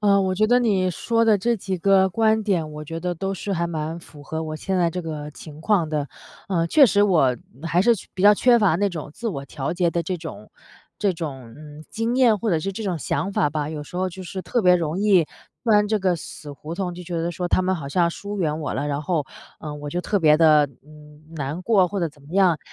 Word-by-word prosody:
呃， 200 -1 +4
我 185 -1 0
觉 215 - +2
得 245 +2 +4
你 195 -6 +1
说 230 +5 0
的 215 -3 +4
这 235 +4 +1
几 190 -2 -4
个 190 +1 +4
观 220 +2 +2
点， 175 -7 -1
我 150 0 -7
觉 165 +2 -6
得 175 +1 -2
都 195 +3 -3
是 195 +1 -4
还 170 -1 0
蛮 160 +1 -4
符 150 -3 -15
合 160 +2 -4
我 155 -1 -5
现 190 +3 -2
在 170 -2 +2
这 180 - -4
个 150 -3 -6
情 150 0 -12
况 175 -4 +2
的。 150 -2 -2 0.4
呃， 170 -3 +1
确 285 - +6
实 205 -3 +4
我 145 -10 +3 0.3
还 170 +2 +1
是 235 +4 +4
缺 205 - -11
比 185 - -6
较 205 +1 +8
缺 240 +2 +4
乏 200 -7 +3
那 200 +3 +1
种 160 -5 -6
自 235 0 -4
我 140 -8 -5
调 140 +1 -4
节 175 -1 +1
的 170 0 -1
这 180 +2 -3
种 160 -10 -9 0.5
这 200 -3 +1
种， 135 -8 -7
嗯， 150 0 -12
经 230 +2 -1
验 240 -5 +5
或 225 - -1
者 165 - +2
是 195 +5 -3
这 220 +4 -6
种 180 -5 -2
想 195 +6 -2
法 150 - +1
吧， 150 0 -2
有 150 -2 -6
时 175 - -10
候 185 +1 0
就 185 +1 -9
是 190 +1 -6
特 240 - 0
别 180 0 +6
容 165 +1 -2
易 195 -5 +4 0.4
钻 210 -3 +4
这 215 -1 +1
个 185 -2 +1
死 150 -1 -9
胡 155 +4 -8
同， 180 -1 -3
就 180 - -8
觉 175 -1 -4
得 170 - -1
说 175 +1 -3
她 - - +3
们 185 +1 +1
好 140 -4 -6
像 170 +3 +2
疏 205 +3 -6
远 155 -2 0
我 150 - -3
了， 140 +2 -2
然 145 0 -2
后， 155 -3 -1 0.4
呃， 155 -2 -6
我 145 0 -7
就 175 - -2
特 205 +3 0
别 150 -3 +5
地， 155 -2 +5 0.2
嗯， 150 0 -16
难 145 +4 -4
过 195 -3 +4
或 200 +1 -3
者 170 - 0
怎 145 -1 -21
么 140 - -17
样。 185 -5 +3
175 Hz, 275 characters per minute, -23 LUFS, 155-200 Hz, 0.5 s, 较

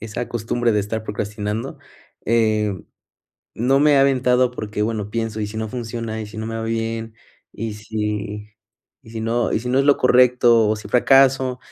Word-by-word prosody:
esa 115 +2 -5
costumbre 120 +1 -1
de 105 - +2
estar 110 +2 -4
procrastinando. 105 +3 -4 0.5
Eh, 110 -2 +2 0.8
no 130 +4 +2
me 150 0 +5
he - - +4
aventado 130 -2 +3
porque, 105 -3 -4
bueno, 105 -2 -2
pienso, 115 -1 -3
¿y 105 - -1
si 105 +2 -8
no 110 0 -3
funciona, 115 -2 -5
y 110 - -5
si 105 - -12
no 110 - -4
me 115 0 -4
va 115 - -4
bien, 115 0 -3 0.4
y 115 -1 -5
si 105 -1 -4 0.5
y 110 - -15
si 115 0 -6
no 115 +2 0
y - - 0
si 125 - -5
no 130 - +2
es 135 - +3
lo 145 - +5
correcto 125 -3 +4
o 110 - +1
si 105 -1 -10
fracaso? 130 +1 +3
115 Hz, 190 wpm, -21 LUFS, 105-125 Hz, 0.8 s, me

